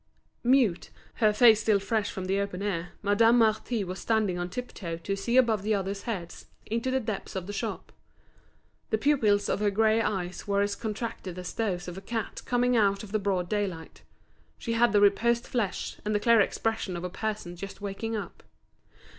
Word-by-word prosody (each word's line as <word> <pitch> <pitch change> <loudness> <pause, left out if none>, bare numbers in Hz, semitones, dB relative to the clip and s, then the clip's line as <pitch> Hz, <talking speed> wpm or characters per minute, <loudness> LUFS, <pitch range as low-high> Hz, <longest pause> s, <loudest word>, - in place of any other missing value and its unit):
Mute, 245 -8 +3 0.3
her 215 -2 +4
face 220 0 +6
still 215 -1 +3
fresh 205 +1 -1
from 190 - -5
the 195 +1 0
open 200 -1 -3
air, 180 -4 -3
Madame 225 +4 +4
Marty 220 0 +2
was 185 0 -5
standing 220 -5 +1
on 175 0 -3
tip 250 +6 -6
toe 170 -4 -5
to 195 +4 -3
see 235 +5 0
above 230 -5 +4
the 215 +2 +1
others' 195 0 -3
heads 190 -8 -6 0.2
into 230 +3 -2
the 260 0 +1
depths 215 -6 -5
of 190 -2 -3
the 205 - -6
shop. 220 +2 -4 1.0
The 220 - +2
pupils 215 -6 +2
of - - 0
her 210 0 +2
grey 220 +2 +3
eyes 185 -4 -3
were 200 0 +2
as 205 0 -1
contracted 215 -5 -5
as 180 0 -6
those 185 -6 -2
of 180 +1 -6
a - - -15
cat 225 +1 -4
coming 245 0 +2
out 200 -3 +2
of 205 - -10
the 215 - +1
broad 190 -3 0
daylight; 190 -5 -3 0.6
she 230 - -3
had 235 0 +4
the 205 0 +4
reposed 235 +4 +3
flesh, 215 -7 -2
and 210 0 -1
the - - +3
clear 230 +1 +5
expression 220 -3 -1
of 170 - -6
a 180 - -3
person 210 -4 -4
just 195 +3 -8
waking 205 +3 -4
up. 210 - -6
205 Hz, 195 wpm, -28 LUFS, 195-225 Hz, 1.0 s, face